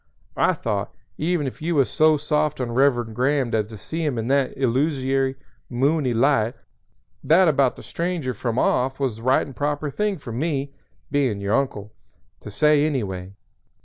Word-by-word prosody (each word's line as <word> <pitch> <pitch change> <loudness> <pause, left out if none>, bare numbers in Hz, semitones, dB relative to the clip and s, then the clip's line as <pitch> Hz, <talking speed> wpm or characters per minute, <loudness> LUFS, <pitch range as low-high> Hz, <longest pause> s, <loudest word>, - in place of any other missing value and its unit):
I - - +4
thought, - - -3 0.3
even 165 -1 0
if 130 - -6
you 170 +2 -1
was 135 -3 +4
so 155 0 +3
soft 150 0 0
on 125 -2 -2
Reverend 120 -3 +2
Graham 130 0 +1
as 110 -2 +1
to 110 0 -10
see 160 +11 -5
him 145 -6 -1
in 115 +2 -2
that 140 -1 +1
illusory, 135 0 +1 0.3
moony 135 +2 +1
light, 120 -1 +2 0.7
that 175 +4 +5
about 140 -4 +3
the - - -12
stranger 170 -7 -3
from 115 +1 -3
off 130 +1 +1
was 130 -6 -1
the - - -11
right 130 +3 +2
and 135 - -11
proper 145 0 -2
thing 205 +6 -1
for 130 -6 -9
me, 140 +2 -2 0.4
being 135 -8 +1
your 100 +1 -1
uncle, 110 -6 -1 0.5
to - - -9
say 150 +7 +3
any 145 -6 0
way. 95 -1 -6
135 Hz, 180 wpm, -23 LUFS, 120-150 Hz, 0.7 s, that